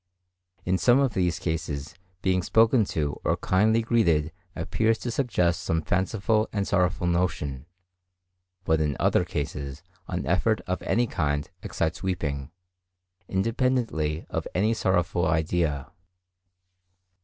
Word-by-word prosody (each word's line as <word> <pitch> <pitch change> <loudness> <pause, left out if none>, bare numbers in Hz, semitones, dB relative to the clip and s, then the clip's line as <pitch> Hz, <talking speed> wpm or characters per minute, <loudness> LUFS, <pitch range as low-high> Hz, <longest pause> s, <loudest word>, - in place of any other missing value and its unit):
In 90 +1 +1
some 125 0 +5
of 135 -4 +2
these 90 -2 +1
cases, 75 -3 -3
the 90 - -29 0.2
being 95 -1 +2
spoken 115 +4 +4
to 75 -5 -2
or - - +1
kindly 110 +4 +2
greeted 85 -10 +2 0.2
appears 110 +8 +1
to 120 - -4
suggest 90 - +1
some 80 -3 -1
fanciful 105 +5 +1
and 100 -2 -1
sorrowful 90 -3 +1
notion; 85 -6 -1 1.0
but 80 -3 +2
in 75 -2 0
other - - +3
cases 70 0 -5 0.2
an - - -3
effort 95 +7 +2
of 90 0 -3
any 120 +2 +1
kind 75 -8 -2
excites 80 -1 -2
weeping, 75 -7 -2 0.8
independently 110 - 0
of - - -2
any 105 +5 +2
sorrowful 90 -5 +1
idea. 80 -3 0
90 Hz, 125 wpm, -26 LUFS, 80-110 Hz, 1.0 s, some